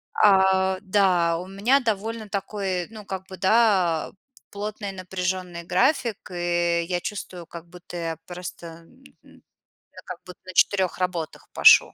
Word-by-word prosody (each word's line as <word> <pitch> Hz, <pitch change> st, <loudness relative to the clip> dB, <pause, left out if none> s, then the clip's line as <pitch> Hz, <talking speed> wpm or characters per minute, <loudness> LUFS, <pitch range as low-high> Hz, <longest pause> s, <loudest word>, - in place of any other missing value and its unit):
а, 190 Hz, -1 st, +4 dB
да, 185 Hz, -4 st, +3 dB
у 180 Hz, -, -7 dB
меня 215 Hz, +9 st, +2 dB
довольно 220 Hz, -1 st, -2 dB
такой, 195 Hz, -2 st, -3 dB
ну, 215 Hz, -2 st, -10 dB
как 190 Hz, -1 st, -6 dB
бы, 190 Hz, -, -8 dB
да, 190 Hz, -4 st, +3 dB, 0.4 s
плотный, 205 Hz, 0 st, -5 dB
напряжённый 185 Hz, -1 st, -4 dB
график, 230 Hz, -, 0 dB
и 175 Hz, -1 st, +1 dB
я 180 Hz, -1 st, -1 dB
чувствую, 180 Hz, -3 st, -6 dB
как 170 Hz, 0 st, -10 dB
будто 175 Hz, 0 st, -11 dB
я 165 Hz, -1 st, -3 dB
просто, 175 Hz, -1 st, -8 dB
м, 165 Hz, 0 st, -14 dB, 0.2 s
м, -, -, -19 dB, 0.5 s
я -, -, -12 dB
как -, -, -7 dB
будто 180 Hz, -1 st, -12 dB
на 185 Hz, -, -9 dB
4 190 Hz, -1 st, +3 dB
работах 175 Hz, -5 st, -3 dB
пашу. -, -, +7 dB
185 Hz, 145 wpm, -24 LUFS, 175-200 Hz, 0.5 s, пашу